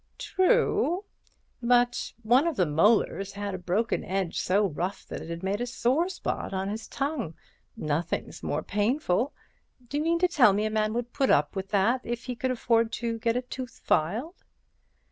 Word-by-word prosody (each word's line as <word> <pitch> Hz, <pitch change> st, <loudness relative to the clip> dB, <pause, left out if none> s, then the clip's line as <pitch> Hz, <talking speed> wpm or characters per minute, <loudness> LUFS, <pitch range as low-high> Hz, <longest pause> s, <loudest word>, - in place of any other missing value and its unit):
"True; 375 Hz, -2 st, +2 dB, 0.6 s
but 245 Hz, 0 st, +2 dB
one 250 Hz, +8 st, +4 dB
of 330 Hz, -, 0 dB
the 185 Hz, -, +3 dB
molars 195 Hz, +4 st, +2 dB
has 200 Hz, 0 st, -4 dB
a 185 Hz, -, -4 dB
broken 185 Hz, +6 st, 0 dB
edge 190 Hz, -3 st, -2 dB
so 200 Hz, +3 st, +2 dB
rough 185 Hz, +3 st, -3 dB
that -, -, -6 dB
it -, -, -8 dB
had 170 Hz, +1 st, -5 dB
made 200 Hz, +4 st, -1 dB
a 245 Hz, -, -1 dB
sore 260 Hz, +6 st, +1 dB
place 380 Hz, -, -7 dB, 0.3 s
on 190 Hz, 0 st, -2 dB
the 220 Hz, +1 st, -5 dB
tongue. 275 Hz, -, -3 dB, 0.4 s
Nothing's 155 Hz, +3 st, -2 dB
more -, -, -2 dB
painful. 220 Hz, +3 st, +1 dB, 0.6 s
D'you 290 Hz, +1 st, -1 dB
mean 335 Hz, +2 st, +2 dB
to 360 Hz, +2 st, +3 dB
tell 260 Hz, -, +5 dB
me 210 Hz, +2 st, 0 dB
a 215 Hz, -, -1 dB
man 215 Hz, 0 st, +1 dB
would 240 Hz, 0 st, -3 dB
put 270 Hz, -, +1 dB
up 145 Hz, +4 st, +3 dB
with 190 Hz, 0 st, -3 dB
that 220 Hz, +5 st, +2 dB
if 235 Hz, 0 st, -4 dB
he 250 Hz, -1 st, -4 dB
could 260 Hz, +3 st, -1 dB
afford 230 Hz, -2 st, +2 dB
to 230 Hz, -1 st, -2 dB
get 230 Hz, +1 st, +1 dB
the 250 Hz, +1 st, -1 dB
tooth 250 Hz, 0 st, -7 dB
filed?" 225 Hz, -, 0 dB
230 Hz, 185 wpm, -27 LUFS, 195-255 Hz, 0.6 s, tell